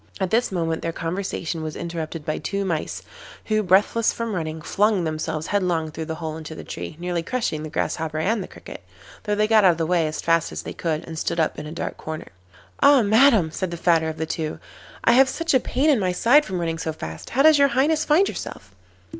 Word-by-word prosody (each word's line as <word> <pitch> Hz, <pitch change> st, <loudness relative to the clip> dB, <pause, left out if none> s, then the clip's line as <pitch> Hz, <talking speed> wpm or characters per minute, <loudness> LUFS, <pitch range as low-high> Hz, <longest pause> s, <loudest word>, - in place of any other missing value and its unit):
At 190 Hz, -2 st, -1 dB
this 235 Hz, 0 st, +2 dB
moment 165 Hz, -3 st, -1 dB
their 165 Hz, -, -2 dB
conversation 170 Hz, -1 st, -3 dB
was 155 Hz, -1 st, -5 dB
interrupted 165 Hz, -2 st, -5 dB
by 155 Hz, -, -2 dB
two 200 Hz, 0 st, -2 dB
mice, 165 Hz, -5 st, -3 dB, 0.4 s
who, 215 Hz, -1 st, +1 dB
breathless 205 Hz, +4 st, +3 dB
from 230 Hz, -2 st, -4 dB
running, 160 Hz, -3 st, -3 dB
flung 200 Hz, +4 st, +1 dB
themselves 155 Hz, 0 st, -3 dB
headlong 175 Hz, -6 st, 0 dB
through 160 Hz, +1 st, -5 dB
the 160 Hz, 0 st, -4 dB
hole 160 Hz, -1 st, -5 dB
into 160 Hz, 0 st, -8 dB
the -, -, -8 dB
tree, 155 Hz, -, -7 dB
nearly 175 Hz, -1 st, -2 dB
crushing 195 Hz, -5 st, -2 dB
the 155 Hz, -, -6 dB
Grasshopper 160 Hz, 0 st, -2 dB
and 205 Hz, +7 st, 0 dB
the -, -, -6 dB
Cricket, -, -, -11 dB, 0.4 s
though 210 Hz, -1 st, 0 dB
they 210 Hz, +1 st, +2 dB
got 215 Hz, -1 st, +5 dB
out 180 Hz, -2 st, +6 dB
of -, -, -9 dB
the 165 Hz, -, 0 dB
way 170 Hz, -1 st, +2 dB
as 155 Hz, -, -4 dB
fast 165 Hz, -1 st, +1 dB
as -, -, -5 dB
they -, -, -6 dB
could 160 Hz, -2 st, -2 dB
and 160 Hz, -1 st, -6 dB
stood 170 Hz, -, -2 dB
up 160 Hz, -, 0 dB
in 150 Hz, -, -7 dB
a -, -, -7 dB
dark 165 Hz, -, -5 dB
corner. 155 Hz, 0 st, -7 dB, 0.5 s
'Ah, 280 Hz, -3 st, +6 dB
Madam,' 215 Hz, -, +4 dB
said 185 Hz, +3 st, -3 dB
the 170 Hz, -, -5 dB
fatter 165 Hz, -2 st, +2 dB
of 160 Hz, -, -6 dB
the 160 Hz, -, -2 dB
two, 155 Hz, -1 st, -3 dB, 0.5 s
'I -, -, +5 dB
have 260 Hz, +2 st, +6 dB
such 330 Hz, +4 st, -1 dB
a 260 Hz, -, +6 dB
pain 265 Hz, +4 st, 0 dB
in 270 Hz, -, +3 dB
my 185 Hz, -2 st, +1 dB
side 250 Hz, +11 st, +4 dB
from 185 Hz, -2 st, -3 dB
running 165 Hz, -1 st, -2 dB
so 160 Hz, -, -2 dB
fast. 80 Hz, -, -8 dB
How 270 Hz, +3 st, +2 dB
does 310 Hz, -1 st, +7 dB
your 280 Hz, -, +6 dB
Highness 290 Hz, +5 st, +2 dB
find 325 Hz, +7 st, +4 dB
yourself? 95 Hz, -, -7 dB
175 Hz, 235 wpm, -23 LUFS, 160-220 Hz, 0.5 s, does